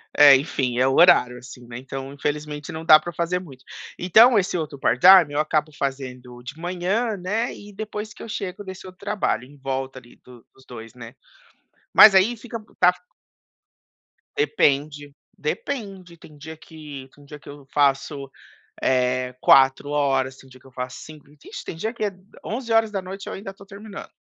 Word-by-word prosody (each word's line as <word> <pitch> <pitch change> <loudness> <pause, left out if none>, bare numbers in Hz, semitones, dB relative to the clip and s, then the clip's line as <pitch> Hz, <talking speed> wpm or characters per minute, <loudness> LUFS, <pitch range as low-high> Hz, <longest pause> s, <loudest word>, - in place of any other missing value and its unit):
É, 145 -1 +9
enfim, 130 -3 -2
é 130 +1 +3
o 135 - +1
horário, 125 -8 +5
assim, 125 0 -13
né. 120 - -8
Então, 135 +1 -7
infelizmente, 150 0 -4
não 160 0 -7
dá 155 -2 +8
para 175 +3 -8
fazer 170 +2 -1
muito. 135 -8 -14 0.3
Então, 220 +7 +5
esse 185 -2 0
outro 155 -3 -5
part 130 - 0
time 180 -4 +7
eu 145 - -1
acabo 155 0 0
fazendo 130 -3 -6
de 145 +5 -9
manhã, 185 +6 -2
né, 210 +6 -2
e 205 0 -13
depois 210 +1 -7
que - - -15
eu - - -8
chego 200 -2 -6
desse 190 -1 -10
outro 185 -1 -13
trabalho, 200 - -2
em 145 +2 -18
volta 135 -1 -5
ali 120 -1 -20
do 125 -2 -16
dos 130 - -22
2, 115 -2 -11
né. 120 +1 -12 0.8
Mas 210 -2 +9
aí 205 +6 +4
fica 230 0 -8 0.2
tá 180 - +6
f 180 - -5 1.3
Depende, 145 - 0 0.2
depende, 190 - -5
tem 150 -2 -16
dia 160 +2 -10
que 150 -4 -11
tem 145 - -19
dia 150 +1 -11
que - - -15
eu 145 -1 -12
faço, 140 -1 0 0.5
eh, 125 0 0
4 135 +1 +4
horas, 135 -2 0
tem 135 - -17
dia 130 0 -16
que - - -27
eu - - -18
faço 125 0 -6
5, 155 -1 -13 0.2
vixe, - - -10
tem - - -6
dia 220 +8 -4
que 215 - -3
é 205 - -3 0.3
23:00 215 -5 -2
eu - - -5
ainda 195 0 -7
estou 195 0 -16
terminando. 200 +1 -10
150 Hz, 185 wpm, -23 LUFS, 135-190 Hz, 1.3 s, É